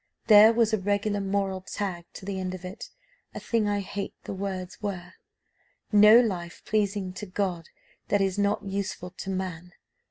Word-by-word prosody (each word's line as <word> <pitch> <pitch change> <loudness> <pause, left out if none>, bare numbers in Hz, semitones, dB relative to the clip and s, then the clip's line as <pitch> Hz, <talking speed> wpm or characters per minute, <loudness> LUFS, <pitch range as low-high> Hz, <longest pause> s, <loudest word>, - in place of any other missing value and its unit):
There 215 0 +8
was 230 -1 +2
a 220 - +2
regular 205 +1 0
moral 195 -1 -1
tagged 185 -3 -5
to 190 - -9
the 195 -1 -3
end 185 0 -3
of 185 0 -10
it, 185 +4 -8 0.5
a - - -4
thing 225 -3 0
I 205 0 0
hate, 200 0 -5
the - - -5
words 190 -1 -5
were, 185 -4 -5 0.8
'No 210 +2 +8
life 180 -8 -2
pleasing 200 -3 0
to 205 +3 -7
God 185 -3 -3 0.4
that 205 - +2
is 195 0 0
not 205 +1 +1
useful 195 -2 -4
to 190 +1 -8
man. 180 -2 -4
195 Hz, 170 wpm, -27 LUFS, 185-205 Hz, 0.8 s, There